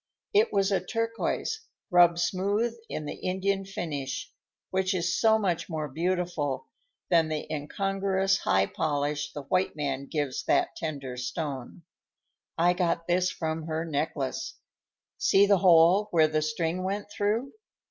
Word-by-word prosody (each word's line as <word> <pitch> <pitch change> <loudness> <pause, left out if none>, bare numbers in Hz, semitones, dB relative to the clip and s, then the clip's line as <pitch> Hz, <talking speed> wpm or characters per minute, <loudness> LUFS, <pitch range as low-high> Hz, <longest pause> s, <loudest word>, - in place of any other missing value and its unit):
It 425 +3 +4
was 195 0 +2
a 190 -2 +1
turquoise, 230 - -2 0.3
rubbed 175 -1 +6
smooth 200 +6 0 0.2
in 155 - -4
the - - -4
Indian 195 +1 -1
finish, 145 -8 -4 0.4
which 190 0 +1
is 170 -1 0
so 220 -1 +4
much 190 -6 -1
more 155 -2 -3
beautiful 165 -2 -1 0.5
than 165 -2 +5
the 155 -1 -3
incongruous 195 +5 0
high 95 0 +2
polish 145 +2 -1
the 145 - -7
white 185 +6 0
man 140 -2 -3
gives 145 -5 -2
that - - +2
tender 140 -6 -5
stone. 125 - -5 0.7
"I 175 +2 +4
got 175 -2 0
this 180 +1 +2
from 160 -2 -3
her 160 +1 -2
necklace. 145 -3 -2 0.6
See 195 +1 +5
the 200 -1 +4
hole 180 +3 +6
where 160 -4 +4
the 155 0 0
string 165 +3 -1
went 200 +2 -3
through? 215 +7 -1
170 Hz, 140 wpm, -28 LUFS, 150-195 Hz, 0.7 s, rubbed